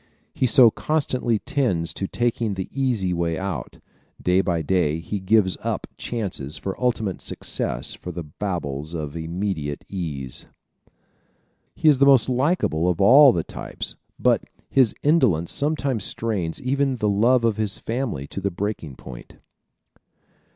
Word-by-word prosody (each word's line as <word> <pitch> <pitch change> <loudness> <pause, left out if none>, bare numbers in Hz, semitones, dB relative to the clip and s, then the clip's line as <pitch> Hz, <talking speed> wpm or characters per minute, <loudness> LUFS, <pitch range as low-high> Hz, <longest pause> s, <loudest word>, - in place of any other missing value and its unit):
He 130 - +1
so 120 0 +7
constantly 130 -7 0
tends 105 - -1
to 95 - -3
taking 115 -3 -1
the 95 -1 -4
easy 120 -9 0
way 85 -1 -1
out. 95 -10 -5 0.4
Day 90 +1 +3
by 85 -4 -1
day 80 -2 +1
he 90 +5 -4
gives 95 0 +3
up - - -2
chances 90 - -4
for 95 +3 -4
ultimate 110 -6 0
success - - -3
for 90 - -7
the 85 0 -6
baubles 80 -2 -4
of 75 -2 -5
immediate 80 -3 -3
ease. 75 -9 -4 1.3
He 160 - 0
is 145 -4 +6
the 140 - +5
most 135 -5 +6
likable 125 - +1
of 90 - -1
all 130 +7 +8
the 85 -7 -1
types - - -6 0.2
but - - +2 0.3
his 130 -5 +4
indolence 125 - +3
sometimes 140 -6 0
strains 100 -9 -1
even 135 +1 0
the 105 - 0
love 115 +4 +3
of 110 -2 +1
his 105 -2 -1
family 115 - -3
to 95 - -5
the 100 - 0
breaking 95 -6 -4
point. 65 -1 -11
100 Hz, 145 wpm, -23 LUFS, 85-125 Hz, 1.3 s, all